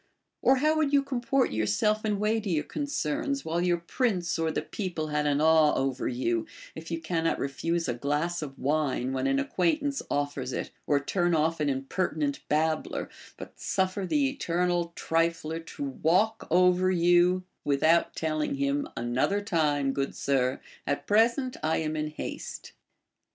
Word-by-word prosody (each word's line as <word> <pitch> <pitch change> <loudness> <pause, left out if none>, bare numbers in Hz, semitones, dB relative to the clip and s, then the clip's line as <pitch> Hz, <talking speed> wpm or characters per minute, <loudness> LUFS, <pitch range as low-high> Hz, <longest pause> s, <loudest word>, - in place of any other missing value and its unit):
Or 265 - +5
how 305 +4 +2
would 305 -3 +2
you 280 -1 +5
comport 270 0 0
yourself 110 - +1
in 210 -2 0
weightier 210 -6 0
concerns, 280 - -2
Avhile 170 +2 -1
youi 175 -1 0
prince 185 -8 0
or 165 0 +1
the - - -2
people 175 -6 -4
had 150 0 0
an 145 0 +2
awe 160 -1 +5
over 135 -1 -1
you, 120 -2 -1 0.3
if 160 +1 -9
you 165 -1 -2
cannot 165 0 0
refuse 165 +5 -2
a 120 - 0
glass 150 +7 -1
of 140 -3 -7
wine 140 -3 0
when 130 0 0
an 135 0 +2
acquaintance 230 - 0
offers 145 -3 -2
it, - - -4 0.2
or 145 -1 +3
turn 175 +4 +1
off 160 +1 +1
an 150 -1 +1
impertinent 140 +1 -1
babbler, 155 +1 0 0.3
but - - -10
suffer 190 +1 -1
the 280 +6 +2
eternal 175 -9 0
trifler 165 -1 0
to 140 -3 -5
Avalk 185 +11 +1
over 180 +1 +4
you 175 +1 +4 0.2
without 155 +4 +2
telling 155 -2 -1
him, 140 +1 0
Another 125 +12 +1
time, 150 -8 +1
good 135 0 -2
sir, 130 -2 0 0.3
at 145 0 -1
present 235 +5 +2
I 160 +1 +1
am 155 -1 -2
in 155 0 -1
haste. 155 - -7
165 Hz, 155 wpm, -28 LUFS, 145-185 Hz, 0.3 s, Or